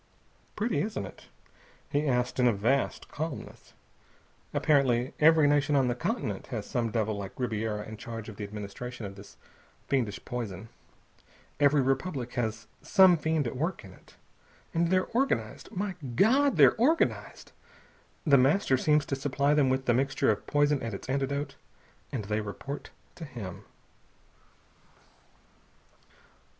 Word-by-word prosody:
"Pretty, 225 +3 0
isn't 215 +2 -3
it?" - - -13 0.6
he 150 +1 +1
asked 125 -1 0
in 125 - +5
a 120 - +4
vast 120 +7 0
calmness. 155 -2 -7 0.8
"Apparently 130 -4 +2
every 155 -1 +6
nation 145 0 +2
on 135 -3 +3
the - - +1
continent 120 - -3
has 115 -6 -4
some 120 -2 -1
devil 110 -1 -1
like 100 +2 -7
Ribiera 110 -3 -2
in 110 - -8
charge 115 0 -7
of 110 - -8
the 105 - -6
administration 105 +3 -7
of 100 - -6
this 100 0 -14 0.5
fiendish 115 -8 0
poison. 110 -4 -5 0.9
Every 145 -1 +4
republic 135 -1 -1
has 110 -2 -2 0.2
some 190 -3 +6
fiend 160 -2 0
at 120 - -3
work 160 - -2
in 95 - -12
it. - - -20 0.6
And 170 +1 +2
they're 185 0 +3
organized. 265 +3 -1
My 200 -1 -2 0.2
God! 270 - +4
They're - - +7
organized! 295 +9 0 0.7
The 140 -4 +6
Master 135 +1 +3
seems 150 +2 +2
to 135 - -2
supply 140 +1 +1
them 145 -3 +3
with 130 0 0
the 120 - +3
mixture 135 -1 +2
of 105 - -4
poison 145 -1 +2
and 115 -3 -4
its 100 - -9
antidote, 140 +2 -1 0.6
and 115 -7 -3
they 105 +1 -1
report 135 +7 -6 0.2
to 170 - -10
him...." 115 - -8
130 Hz, 145 wpm, -29 LUFS, 110-150 Hz, 0.9 s, They're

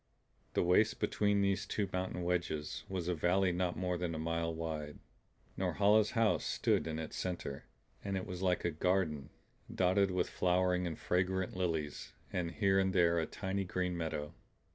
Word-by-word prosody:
The - - +3
waist 90 +5 +3
between 105 -1 +2
these 100 -1 +1
two 105 -2 -1
mountain 90 -1 -2
wedges 85 -4 -2
was 90 -3 -3
a 90 - +1
valley 90 +3 +2
not 90 0 -1
more 90 -1 -1
than 85 -2 -2
a - - -3
mile 85 +1 -1
wide. 80 -2 -4 0.6
Norhala's 105 +1 +3
house 115 -1 +3
stood - - +1
in 80 -1 -3
its 80 -1 -5
center; 85 -6 -4 0.4
and 100 -1 -2
it 95 - -3
was 90 -3 -6
like 90 -2 +1
a 85 - +1
garden, 80 -3 0 0.4
dotted 95 +2 +3
with 90 -1 0
flowering 90 0 +1
and 80 - -4
fragrant 90 +1 0
lilies 80 -5 -2 0.2
and 85 -2 -1
here 95 +2 +2
and 95 -1 +1
there 85 -2 +4
a 80 - -1
tiny 95 0 -2
green 90 -1 -2
meadow. 80 -3 -3
90 Hz, 170 wpm, -34 LUFS, 85-95 Hz, 0.6 s, there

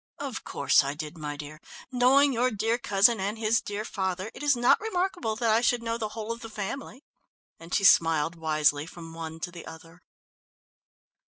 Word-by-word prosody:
"Of - - -5
course - - +2
I 140 +1 -3
did, 155 +1 -7
my 150 -2 -6
dear. 155 +1 -9 0.3
Knowing 265 +3 +4
your 250 +2 +2
dear 225 +2 -1
cousin 205 +1 +3
and 200 +3 -2
his 225 +1 +1
dear 205 +1 -5
father, 190 0 -3
it - - -11
was 290 -2 +3
not 240 0 +4
remarkable 365 - -2
that 225 0 +1
I 225 +2 +3
should 240 -1 +1
know 230 0 -2
the 215 -2 -3
whole 220 0 -4
of 230 - -5
the 225 - -8
family," 230 +6 -6 0.6
and 165 +1 -13
she 200 - +1
smiled 165 -4 +4
wisely 155 -2 +1
from 165 -1 -10
one 160 0 -7
to 175 - -4
the 175 -1 -10
other. 165 +2 -13
205 Hz, 190 wpm, -27 LUFS, 165-235 Hz, 0.6 s, Knowing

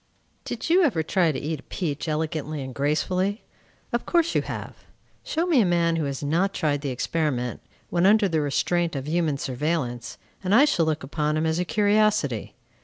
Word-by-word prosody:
Did - - -4
you 350 +3 +5
ever 215 - +2
try 170 0 +2
to 140 - -4
eat 155 0 -3
a - - -18
peach 155 -4 -3
elegantly 155 -2 -2
and 130 -1 -7
gracefully? 180 - 0 0.5
Of 240 - -1
course 340 -1 +2
you - - +2
have. - - -6 0.5
Show 325 +2 -1
me 320 -9 +4
a - - +4
man 170 -1 +2
who 160 -2 -1
has 140 0 -4
not 170 +7 +1
tried 145 -4 0
the 140 - -3
experiment, 125 -2 -1 0.3
when 175 +2 +3
under 210 0 +5
the 160 -4 0
restraint 170 +3 0
of 135 0 -4
human 160 -3 +1
surveillance, 125 -4 -2 0.3
and 190 +3 +2
I 275 +5 +7
shall 170 - +1
look 155 -2 -1
upon 150 +2 -1
him 155 - 0
as 160 +1 0
a 180 - 0
curiosity. 205 - +1
160 Hz, 190 wpm, -25 LUFS, 145-190 Hz, 0.5 s, I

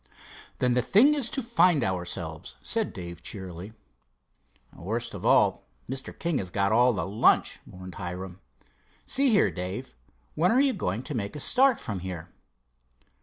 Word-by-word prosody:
"Then 125 -1 +2
the 125 - +3
thing 235 - +5
is 280 -5 +1
to 270 - -2
find 180 - +3
ourselves," 85 -4 -4
said - - -1
Dave, 85 -1 -8
cheerily. 95 +1 -8 1.0
"Worst - - -4
of - - -4
all, - - +4 0.3
Mr. 130 +1 -5
King 170 -4 -1
has 95 - -3
got 100 +2 0
all 120 +3 +5
the 95 -8 -2
lunch," 105 +3 +3
mourned 90 0 -10
Hiram. 90 +1 -6 0.7
"See 275 0 +2
here, 210 -4 +4
Dave, 95 - -5 0.4
when 175 +4 +2
are 245 - +4
you 275 -1 +3
going 100 - -3
to 145 - -6
make 105 -2 -4
a - - -5
start 260 - +3
from 105 -6 -4
here?" 90 -2 -7
110 Hz, 160 wpm, -27 LUFS, -, 1.0 s, thing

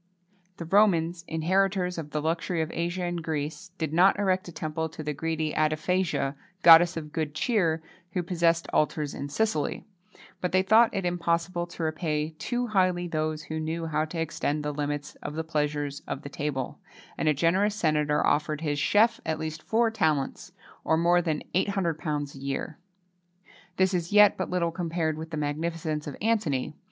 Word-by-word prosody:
The 170 - -6
Romans, 170 -3 +3
inheritors 180 +2 +1
of 155 -2 -6
the 150 0 -3
luxury 165 +2 -1
of 160 - -6
Asia 175 +2 -2
and 175 -1 -3
Greece, 155 +2 -4
did 160 -2 -3
not 185 +4 +5
erect 190 -2 +1
a - - -7
temple 160 0 -3
to 155 0 -8
the 150 0 -2
greedy 160 +1 -2
Addephagia, 155 -1 0 0.3
goddess 170 0 +8
of 150 -2 -6
good 155 -2 -2
cheer, 165 -5 +1 0.3
who 180 - 0
possessed 170 -1 +1
altars 150 -1 +1
in 140 - -5
Sicily;[XXII 160 -2 -1 0.3
22] - - -19 0.2
but 180 0 -2
they 185 0 +4
thought 225 +4 +6
it 195 -3 -2
impossible 175 0 0
to 175 -1 -6
repay 155 -1 -1
too 245 0 -1
highly 185 -5 +1
those 155 -1 -2
who 160 0 -4
knew 160 +1 -3
how 155 -1 0
to 165 +1 -6
extend 150 -2 -2
the 150 - -1
limits 145 0 -3
of 150 - -5
the 160 - -2
pleasures 150 -2 -2
of 140 - -4
the 145 - -6
table,[XXII 140 -3 -6
23] - - -12
and 155 - +2
a - - +4
generous 190 +6 +2
senator 150 -6 +1
offered 150 +1 +1
his 145 -2 -1
chef 225 +8 +3
at 160 -1 -1
least 155 0 -5
four 225 +4 +2
talents, 155 -10 -1 0.3
or 160 - +2
more 175 +1 +4
than 160 -3 -2
£800 160 -7 -1
a 135 - -11
year. 140 +3 -4 1.0
This 190 0 +3
is 175 0 -1
yet 210 0 +7
but - - -3
little 175 -2 0
compared 165 -2 -1
with 160 0 -6
the 160 - -5
magnificence 155 +1 -2
of 145 - -6
Antony. 195 - 0
165 Hz, 180 wpm, -27 LUFS, 150-180 Hz, 1.0 s, goddess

